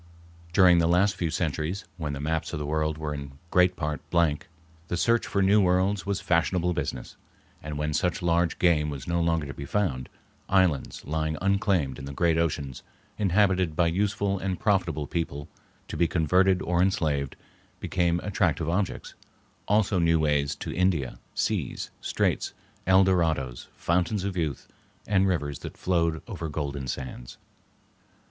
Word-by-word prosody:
During 90 Hz, -1 st, +6 dB
the 85 Hz, -, +3 dB
last 95 Hz, +4 st, +3 dB
few 85 Hz, -, -1 dB
centuries, 80 Hz, +3 st, -2 dB
when 75 Hz, -4 st, -3 dB
the 70 Hz, -, -5 dB
maps 80 Hz, +3 st, -2 dB
of -, -, -1 dB
the 75 Hz, -, -3 dB
world 75 Hz, +1 st, -1 dB
were 75 Hz, -1 st, -3 dB
in 70 Hz, -1 st, -8 dB
great 90 Hz, 0 st, +4 dB
part 75 Hz, -3 st, -3 dB
blank, 85 Hz, -4 st, +1 dB, 0.4 s
the 85 Hz, -, -2 dB
search 115 Hz, +7 st, +2 dB
for 100 Hz, -, +1 dB
new 100 Hz, +2 st, +5 dB
worlds 95 Hz, +1 st, +1 dB
was 100 Hz, -1 st, 0 dB
fashionable 90 Hz, +1 st, +1 dB
business, 65 Hz, -6 st, -4 dB, 0.4 s
and 75 Hz, 0 st, -5 dB
when 75 Hz, 0 st, -1 dB
such 90 Hz, +3 st, 0 dB
large 85 Hz, 0 st, +2 dB
game 80 Hz, -4 st, +3 dB
was 70 Hz, -4 st, -6 dB
no 85 Hz, 0 st, +1 dB
longer 85 Hz, -2 st, +1 dB
to 70 Hz, -, -6 dB
be 70 Hz, -, -7 dB
found, 70 Hz, -11 st, -1 dB, 0.4 s
islands 90 Hz, -8 st, +1 dB
lying 80 Hz, +1 st, -1 dB
unclaimed 95 Hz, -9 st, +1 dB
in 70 Hz, -, -7 dB
the 70 Hz, -, -6 dB
great 85 Hz, 0 st, +2 dB
oceans, 70 Hz, -5 st, -2 dB, 0.4 s
inhabited 95 Hz, -4 st, +2 dB
by 85 Hz, -, +3 dB
useful 100 Hz, +3 st, 0 dB
and 95 Hz, -2 st, -2 dB
profitable 90 Hz, -7 st, +1 dB
people 70 Hz, -2 st, -3 dB, 0.4 s
to -, -, -6 dB
be 85 Hz, -, +2 dB
converted 90 Hz, +4 st, +3 dB
or 85 Hz, 0 st, +1 dB
enslaved, 75 Hz, -7 st, 0 dB, 0.4 s
became 85 Hz, -1 st, 0 dB
attractive 90 Hz, -6 st, 0 dB
objects; 90 Hz, +3 st, -2 dB, 0.5 s
also 105 Hz, -2 st, +2 dB
new 80 Hz, -1 st, +3 dB
ways 75 Hz, -2 st, +1 dB
to -, -, -6 dB
India, 90 Hz, -8 st, 0 dB, 0.2 s
seas, -, -, -2 dB
straits, -, -, -1 dB, 0.3 s
El 95 Hz, +1 st, +6 dB
Dorados, 80 Hz, -10 st, 0 dB
fountains 90 Hz, +3 st, 0 dB
of 100 Hz, -1 st, -3 dB
youth, 80 Hz, -7 st, -2 dB, 0.4 s
and 95 Hz, -2 st, +3 dB
rivers 75 Hz, -7 st, -1 dB
that -, -, -8 dB
flowed 85 Hz, -3 st, 0 dB
over 85 Hz, -8 st, -5 dB
golden 70 Hz, -3 st, -4 dB
sands. 65 Hz, -1 st, -6 dB
85 Hz, 160 wpm, -27 LUFS, 75-95 Hz, 0.5 s, During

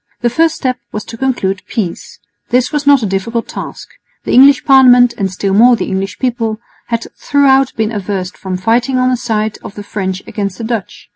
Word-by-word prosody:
The 240 Hz, -1 st, +1 dB
first 320 Hz, +5 st, +2 dB
step 255 Hz, -2 st, -2 dB
was 210 Hz, -, -5 dB
to -, -, -9 dB
conclude 225 Hz, -7 st, -1 dB
peace. 190 Hz, -7 st, -5 dB, 0.3 s
This 250 Hz, 0 st, +1 dB
was 295 Hz, -2 st, -2 dB
not 280 Hz, -4 st, +5 dB
a -, -, +1 dB
difficult 205 Hz, +4 st, -2 dB
task. -, -, -8 dB, 0.4 s
The -, -, -3 dB
English 275 Hz, +2 st, +6 dB
Parliament, 250 Hz, -3 st, +6 dB
and 195 Hz, -2 st, -2 dB
still 195 Hz, +1 st, -2 dB
more 240 Hz, +4 st, +6 dB
the -, -, -3 dB
English 190 Hz, -3 st, -3 dB
people, 230 Hz, -4 st, -2 dB, 0.3 s
had 230 Hz, -1 st, -2 dB
throughout 270 Hz, -2 st, +2 dB
been 220 Hz, 0 st, -1 dB
averse 195 Hz, -3 st, -3 dB
from 185 Hz, -1 st, -5 dB
fighting 235 Hz, +7 st, +1 dB
on 255 Hz, 0 st, +2 dB
the -, -, +2 dB
side 220 Hz, -3 st, -2 dB
of -, -, -9 dB
the 205 Hz, -, -7 dB
French 190 Hz, -2 st, -4 dB
against 200 Hz, -3 st, -4 dB
the 230 Hz, -, -7 dB
Dutch. 225 Hz, -3 st, -5 dB
230 Hz, 200 wpm, -14 LUFS, 200-255 Hz, 0.4 s, English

